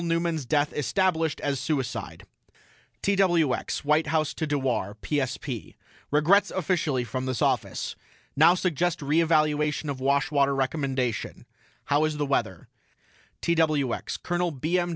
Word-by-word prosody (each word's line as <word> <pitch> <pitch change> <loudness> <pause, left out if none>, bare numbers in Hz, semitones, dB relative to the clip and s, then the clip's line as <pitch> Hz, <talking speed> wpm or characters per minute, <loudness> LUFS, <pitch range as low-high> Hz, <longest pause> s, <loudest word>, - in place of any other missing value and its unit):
NEUMAN'S 165 -4 -1
DEATH 150 0 +1
ESTABLISHED 160 +1 0
AS 140 -2 -1
SUICIDE 120 - -3 0.8
TWX 175 -9 +1
WHITE 150 +2 +3
HOUSE 155 -1 0
TO 155 - -3
DEWAR 130 -8 -1
PSP: 135 -4 -3 0.3
REGRETS 185 +7 +4
OFFICIALLY 165 -9 0
FROM 130 +3 -4
THIS 130 -3 -1
OFFICE - - -1 0.4
NOW 160 +5 +6
SUGGEST 175 -2 -1
RE 150 +4 +2
EVALUATION 150 -2 +1
OF 135 - -6
WASHWATER 140 0 +2
RECOMMENDATION 135 -3 -2 0.4
HOW 145 +2 +2
IS 155 -1 -2
THE 145 - 0
WEATHER 115 -10 -1 0.8
TWX 155 -6 0
COL. 175 0 0
B. 160 +4 -1
M. 175 0 -1
150 Hz, 125 wpm, -26 LUFS, 135-165 Hz, 0.8 s, NOW